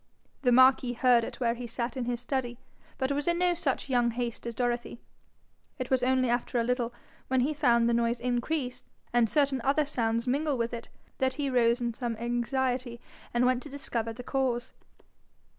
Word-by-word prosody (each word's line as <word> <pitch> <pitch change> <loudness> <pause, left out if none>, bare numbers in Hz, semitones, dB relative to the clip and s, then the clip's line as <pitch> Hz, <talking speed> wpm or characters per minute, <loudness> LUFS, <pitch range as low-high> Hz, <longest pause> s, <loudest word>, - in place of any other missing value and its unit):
The 250 - +3
marquis 255 0 +5
heard 245 -1 +4
it - - -6
where 235 -2 +2
he 240 0 -6
sat 235 +2 -3
in 255 -2 -2
his 240 -1 -2
study, 245 -1 -3 0.4
but 265 0 -1
was 285 +2 -1
in 345 0 +2
no 355 0 +3
such 295 -6 -2
young 245 -3 +2
haste 235 0 -4
as 235 - -5
Dorothy: 240 -1 -2 0.8
it 255 -2 -5
was 260 -1 +3
only 255 0 +2
after 240 0 0
a - - +2
little, 245 0 0 0.4
when 260 -1 +2
he 290 +5 +1
found 240 -6 +3
the 235 - +2
noise 235 0 +1
increase, 250 +2 -2 0.3
and 240 -2 +4
certain 275 -2 +2
other 285 +2 +2
sounds 230 -4 -1
mingle 280 +2 0
with 230 0 -1
it, 235 -1 -6 0.3
that 260 0 +1
he 280 -2 -1
rose 235 -1 +3
in 235 -1 -1
some 235 -1 -3
anxiety 240 +1 -1 0.3
and 240 +1 +2
went 255 0 +2
to 295 - -10
discover 240 -5 -3
the 245 +2 -8
cause. 255 -2 -1
245 Hz, 195 wpm, -29 LUFS, 235-265 Hz, 0.8 s, marquis